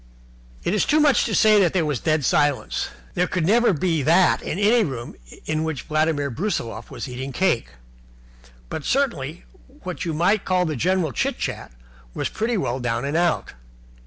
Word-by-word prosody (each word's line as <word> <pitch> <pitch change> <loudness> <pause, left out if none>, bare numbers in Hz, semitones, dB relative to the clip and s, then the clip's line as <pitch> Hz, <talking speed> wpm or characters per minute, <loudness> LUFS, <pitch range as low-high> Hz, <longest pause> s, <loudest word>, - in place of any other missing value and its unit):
It 175 - 0
is 210 - +2
too 305 - +3
much 295 -3 +4
to 220 - -1
say 215 +1 +5
that 180 -5 +3
there 180 -4 +1
was 145 -5 -1
a - - -19
dead 155 -3 +1
silence. 145 0 +1 0.2
There 180 +1 +1
could 180 -4 -1
never 235 +5 +4
be 165 -2 0
that 170 +5 +4
in - - -4
any 215 +3 +4
room 125 - -5 0.3
in 155 0 -1
which 160 -4 -3
Vladimir 155 -2 0
Brusiloff 115 - -3
was - - -6
eating 130 +2 -6
cake. 135 - +1 1.0
But 155 - -5
certainly 170 - -1 0.4
what 180 -1 -5
you 165 -3 -2
might 190 +6 +2
call 185 -1 +1
the 155 -2 -2
general 175 +2 +1
chit - - -1
chat - - -4 0.4
was - - -2
pretty 225 +1 -1
well 130 -8 -2
down 120 0 -2
and 140 +2 -2
out. 170 0 0
165 Hz, 185 wpm, -23 LUFS, 140-190 Hz, 1.0 s, say